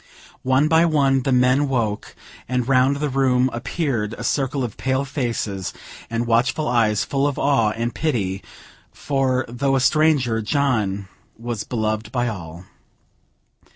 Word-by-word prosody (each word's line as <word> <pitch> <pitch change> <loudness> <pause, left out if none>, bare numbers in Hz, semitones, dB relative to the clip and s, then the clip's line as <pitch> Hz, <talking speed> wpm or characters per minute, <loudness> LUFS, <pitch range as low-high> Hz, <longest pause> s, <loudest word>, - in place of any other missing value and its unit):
One 130 +3 +2
by 160 +1 +4
one, 140 -4 +2
the 135 - -1
men 130 +3 +3
woke, 115 -5 -2 0.3
and 125 -1 -1
round 135 +1 +3
the 150 +1 -1
room 130 -1 +2
appeared 120 -3 -2
a - - -6
circle 135 -1 0
of 115 -4 -4
pale 130 +1 -1
faces 115 - -3 0.4
and 115 +1 -1
watchful 120 +6 +1
eyes, 110 -4 +2
full 140 0 0
of 140 - -3
awe 135 -6 +2
and 115 +1 -3
pity; 100 -11 -2 0.5
for, 130 -2 0
though 135 +3 0
a - - +3
stranger, 140 -5 +2
John 105 -6 0 0.3
was 115 -2 -4
beloved 110 -1 -2
by 120 -1 0
all. 90 -4 -8
125 Hz, 145 wpm, -21 LUFS, 115-135 Hz, 0.5 s, by